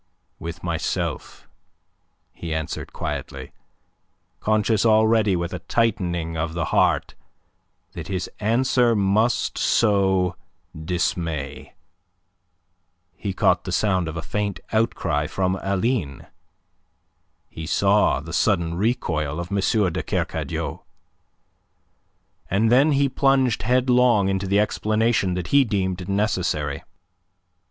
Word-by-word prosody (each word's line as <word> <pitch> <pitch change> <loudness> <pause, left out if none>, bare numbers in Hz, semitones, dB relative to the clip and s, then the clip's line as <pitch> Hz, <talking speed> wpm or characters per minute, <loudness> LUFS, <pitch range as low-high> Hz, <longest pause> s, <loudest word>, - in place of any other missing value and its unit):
"With 85 +1 -7
myself," 85 -2 -3 0.8
he 80 -2 -5
answered 80 -2 -4
quietly, - - -5 0.9
conscious 110 0 +1
already 110 -2 +4
with 85 +1 -3
a 90 - -4
tightening 85 -4 -1
of 80 +1 -3
the 85 -1 -1
heart - - +2 0.8
that 85 -2 -8
his 95 -2 -3
answer 120 +2 +2
must 105 +4 +1
sow 95 -4 +2 0.4
dismay. 85 0 -3 1.4
He 100 - -4
caught 95 - +2
the - - -5
sound 95 -5 +1
of 80 +1 -5
a 85 - -4
faint 105 -1 -3
outcry 110 -9 0
from 95 +2 -1
Aline; 100 - -1 1.2
he 80 -1 -8
saw 100 -2 +3
the 85 +3 -9
sudden 85 -4 +1
recoil 85 - -1
of 85 +3 -6
M. 100 - 0 0.3
de - - -2
Kercadiou. - - -3 1.7
And 110 +4 +2
then 140 +5 +5
he 140 0 +3
plunged 135 -4 +2
headlong 125 -3 +3
into 95 0 -1
the 100 +2 +2
explanation 110 -2 +1
that 90 -2 -4
he 140 0 +5
deemed 95 -4 -2
necessary. 90 -8 -1
100 Hz, 110 wpm, -23 LUFS, 85-110 Hz, 1.7 s, then